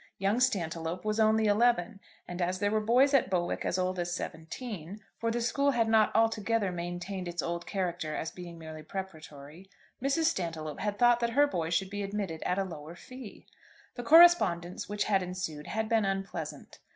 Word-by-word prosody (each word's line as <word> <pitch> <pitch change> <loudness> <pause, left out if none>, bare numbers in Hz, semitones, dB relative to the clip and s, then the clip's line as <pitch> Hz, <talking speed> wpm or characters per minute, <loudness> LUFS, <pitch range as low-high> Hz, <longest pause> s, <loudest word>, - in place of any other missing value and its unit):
Young 200 +5 +1
Stantiloup 170 -6 -1
was 215 +1 0
only 220 0 +4
eleven, 210 -2 +2 0.3
and 175 +1 -5
as 180 +1 0
there 205 +2 0
were 215 - +2
boys 250 +6 +4
at 270 -7 +3
Bowick 175 -2 -1
as 180 - -1
old 185 0 -1
as 175 0 -2
seventeen, 175 +3 -6 0.2
for 230 - 0
the 235 +1 -1
school 280 +4 +1
had 235 -4 +2
not 220 -1 +4
altogether 225 -2 +1
maintained 175 +2 -5
its 175 -1 -3
old 170 0 -4
character 175 -5 -2
as 160 - -3
being 175 -2 -9
merely 160 -1 -9
preparatory, 160 -1 -9 0.3
Mrs. 275 +5 +1
Stantiloup 165 - -2
had 205 -1 -2
thought 240 0 +5
that 235 -1 0
her 290 - +7
boy 170 - -2
should 190 +3 0
be 205 0 -3
admitted 195 -5 -4
at 180 - 0
a 195 - +1
lower 165 -3 -8
fee. 255 +3 -11 0.5
The 245 - -6
correspondence 230 - +5
which 210 0 -1
had 195 -2 +2
ensued 180 -5 -5
had 220 0 -2
been 225 -1 +2
unpleasant. 195 0 -5
195 Hz, 185 wpm, -30 LUFS, 175-225 Hz, 0.5 s, her